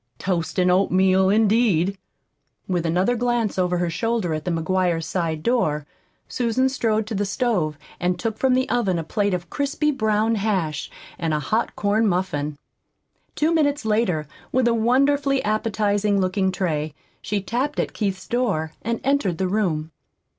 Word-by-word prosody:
Toast 175 -3 -2
an' 180 0 +4
oatmeal, 190 0 +3
indeed!" 205 -4 +3 0.7
With 175 -3 0
another 185 +9 +2
glance 235 -4 0
over 180 -1 +1
her 175 -1 -1
shoulder 215 -1 -1
at 155 0 -4
the - - -1
McGuire 170 0 0
side 160 -3 -2
door 155 - +1 0.4
Susan 250 +2 +1
strode 225 -4 0
to 220 - -5
the 205 0 0
stove 195 - 0 0.2
and 180 0 0
took 220 -2 -3
from 260 -1 +3
the 260 0 +1
oven 195 -7 +1
a 165 - -2
plate 200 +3 0
of 175 0 -7
crisply 290 +2 0
browned 220 -3 +1
hash 185 -8 -1 0.3
and 160 -2 0
a - - 0
hot 220 +9 -1
corn 210 +2 +2
muffin. 155 -6 -1 0.8
Two 315 +2 +2
minutes 290 -5 +1
later, 210 -9 +1 0.2
with 255 -1 +2
a 235 - +3
wonderfully 275 +4 +2
appetizing 210 -1 +1
looking 190 0 +1
tray, 155 -5 -2 0.3
she 205 - -1
tapped 250 +9 -2
at - - -1
Keith's 195 -3 -3
door 200 -11 -1
and 230 +1 -2
entered 265 - +1
the 190 - 0
room. 170 -6 -1
200 Hz, 160 wpm, -23 LUFS, 175-235 Hz, 0.8 s, an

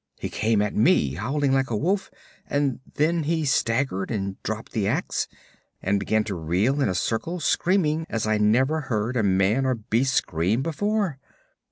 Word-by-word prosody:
He - - -4
came 110 -1 +1
at 105 - -2
me, 105 - +3
howling 135 - 0
like 135 0 +1
a 110 - 0
wolf 190 - 0 0.4
and 140 -2 0 0.2
then 165 +3 +2
he 160 +1 0
staggered 115 -6 0
and 100 -4 -3
dropped - - -5
the - - -1
ax, - - -1 0.5
and 100 +1 0
began 110 +2 +1
to 105 -2 -4
reel 95 - 0
in 135 - +2
a 90 - -1
circle 120 - -1
screaming 165 -3 +1
as 115 - -1
I 110 0 +1
never 130 +9 +3
heard 110 +2 -1
a 120 - +2
man 100 +5 +2
or 130 -1 +1
beast 120 +4 0
scream 95 +8 +1
before. 190 -1 -1
125 Hz, 175 wpm, -24 LUFS, 105-150 Hz, 0.5 s, me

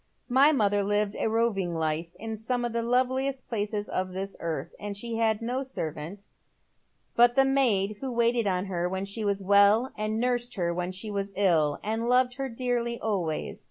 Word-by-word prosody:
My 270 +4 +6
mother 205 -7 +2
lived 205 +1 0
a - - +1
roving 215 -6 0
life 160 +1 -2
in 225 +1 -5
some 240 +3 -2
of 240 - -3
the 235 - 0
loveliest 260 +3 0
places 210 -2 -2
of 185 0 -3
this 195 +1 -4
earth, 165 -2 -4
ind 205 -1 -5
had 225 0 0
no 250 +3 -1
servant 180 - -5 0.9
but 240 0 +5
the 270 - +5
maid 220 -7 +2
who 265 -1 -3
waited 235 -1 +2
on 185 0 0
her 180 -2 -2
when 190 +1 -3
she 200 +3 -3
was 200 -1 0
well 205 +5 +5
and 215 +1 -2
nursed 245 0 0
her 170 -3 0
when 180 +1 -2
she 200 +3 -4
was 200 0 -3
ill, 165 -7 +2
and 225 +3 -1
loved 250 0 +3
her 270 -1 -3
dearly 235 -1 -2
always. 180 -8 -2
215 Hz, 185 wpm, -27 LUFS, 190-240 Hz, 0.9 s, My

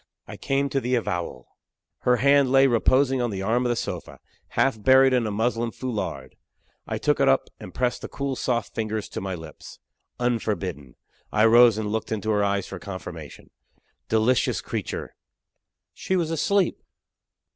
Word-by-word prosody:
I - - -8
came 140 0 0
to 135 0 -1
the 125 +1 0
avowal. 85 - -3 0.5
Her 125 - +3
hand 140 +1 +4
lay 135 0 +6
reposing 130 +1 +3
on 120 - 0
the 95 -2 -4
arm 120 +4 +1
of - - -1
the 120 - +1
sofa, - - -5 0.4
half 130 -5 +2
buried 130 +3 +5
in 120 -3 +2
a - - -1
muslin 115 +2 0
foulard. 95 - -5 0.5
I - - -2
took - - +1
it - - +4
up - - +2
and 90 - -9
pressed 125 +3 -1
the - - -5
cool 140 -1 -3
soft 120 -4 -2
fingers 110 -1 -3
to - - -5
my 95 -1 -3
lips 80 -3 -11 0.4
unforbidden. 100 - -2 0.4
I 110 +1 +3
rose 115 -1 +6
and 105 -1 -2
looked 110 +1 -3
into 110 0 -1
her 105 -1 +2
eyes 100 -1 0
for 95 - -8
confirmation. 90 -5 -9 0.6
Delicious 110 +2 +2
creature! - - -5 0.8
she 190 - -2
was 165 -3 0
asleep! 185 +4 +1
115 Hz, 170 wpm, -24 LUFS, 100-130 Hz, 0.8 s, lay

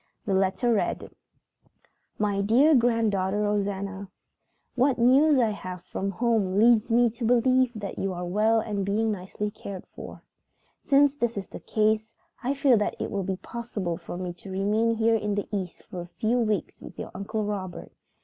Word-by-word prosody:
The 200 - 0
letter 190 +5 +2
read: 215 - -1 1.1
"My 205 -2 0
dear 250 +10 +4
Granddaughter 220 -6 +2
Rosanna: 200 -1 -2 0.6
"What 260 +1 +2
news 270 +5 +5
I 230 -4 +3
have 185 -3 -7
had - - -36
from 195 +1 -3
home 200 -2 0
leads 230 +1 +4
me 240 +1 +5
to 235 +2 -8
believe 250 +2 +3
that 205 -2 -6
you 195 - -1
are 180 0 -4
well 215 +5 +2
and 210 -3 -2
being 215 +3 0
nicely 205 +1 -4
cared 200 -3 -8
for. - - -11 0.6
"Since 285 0 +4
this 235 -4 -1
is 195 - -5
the - - -8
case, 215 0 0 0.3
I 265 +2 -1
feel 270 -3 +4
that 210 - -1
it - - -3
will 200 - -1
be 190 0 -2
possible 210 -6 -4
for 175 - -8
me 180 -1 -4
to 180 +3 -12
remain 210 +4 +1
here 225 +1 +2
in 210 -2 0
the 205 - -2
East 185 -3 -5
for 180 - -7
a 175 - -8
few 230 +3 +1
weeks 215 -3 -1
with - - -11
your - - -6
Uncle 215 +2 -3
Robert. 190 -4 -5
210 Hz, 180 wpm, -26 LUFS, 195-235 Hz, 1.1 s, news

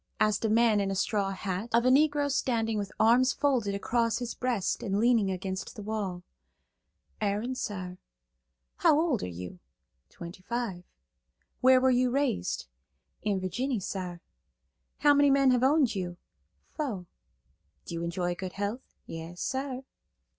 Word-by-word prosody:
asked 215 -1 +2
a 220 - +2
man 225 -1 +4
in 200 -1 0
a 195 - -1
straw 200 +1 0
hat, 195 +2 -4
of 235 +1 +3
a 255 - +5
Negro 290 +1 +3
standing 225 -4 0
with 200 -1 -4
arms 245 +4 +5
folded 245 -9 +1
across 230 +3 0
his 245 -1 -4
breast 240 -7 -1
and 195 -2 -1
leaning 230 -3 +3
against 190 0 -4
the 210 - -7
wall. 200 -4 -3 1.0
"Aaron, 210 +5 0
sar." 185 -7 -5 0.8
"How 300 - +4
old 315 -8 +1
are - - -3
you?" 90 0 -8 0.5
"Twenty 170 +2 -10
five." 210 -4 -4 0.7
"Where 255 0 +6
were 260 0 +4
you 250 0 +3
raised?" 265 - -1 0.6
"In 205 -2 0
Virginny, 230 +7 -2
sar." 180 -2 -5 0.8
"How 290 -1 +6
many 285 0 +5
men 275 -1 +5
have 250 -1 +3
owned 270 -2 +4
you?" 180 -3 -4 0.6
"Fo." 235 - -3 0.8
"Do - - -7
you 165 0 -3
enjoy 175 +1 -1
good 185 +1 -6
health?" 205 +5 -3 0.2
"Yas, 165 +2 -8
sar." 265 -1 -3
215 Hz, 150 wpm, -29 LUFS, 190-255 Hz, 1.0 s, Where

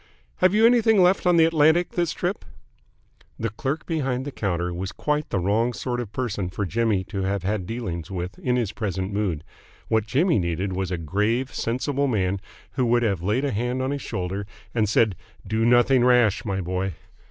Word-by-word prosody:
"Have 185 +2 +3
you 220 +1 +5
anything 230 -3 +5
left 180 +1 +3
on 175 -1 +5
the 165 - +7
Atlantic 165 +2 +3
this 175 -2 0
trip?" - - -3 0.9
The 115 -2 -2
clerk 135 +8 -3
behind 135 -6 -1
the 145 - -4
counter 90 -6 -2
was 95 +2 -4
quite 150 0 -2
the - - -1
wrong 105 +6 +1
sort 120 0 -3
of 115 -5 -5
person 105 -7 -2
for 100 +3 -3
Jimmy 110 -1 +1
to 95 +1 -5
have 95 0 -1
had 95 -2 -2
dealings 95 -9 -4
with 90 0 -5
in 125 -1 0
his 115 -5 0
present 100 -3 -3
mood. 95 -7 -1 0.5
What 110 -1 +1
Jimmy 145 - +2
needed 90 +2 -2
was 95 -1 -2
a 90 - -2
grave, 105 - -1
sensible 140 +4 -1
man 100 -5 0 0.3
who 125 -2 0
would 120 +1 +3
have 100 -6 0
laid 105 +10 0
a 140 - 0
hand 125 +4 -1
on 130 - -1
his 140 -1 -3
shoulder 95 +2 -4 0.3
and 110 -3 +1
said 110 -2 +3 0.3
"Do 110 +3 0
nothing 120 +1 +5
rash, 120 -4 +4
my 95 -2 -1
boy!" 90 +1 -2
110 Hz, 195 wpm, -24 LUFS, 95-130 Hz, 0.9 s, the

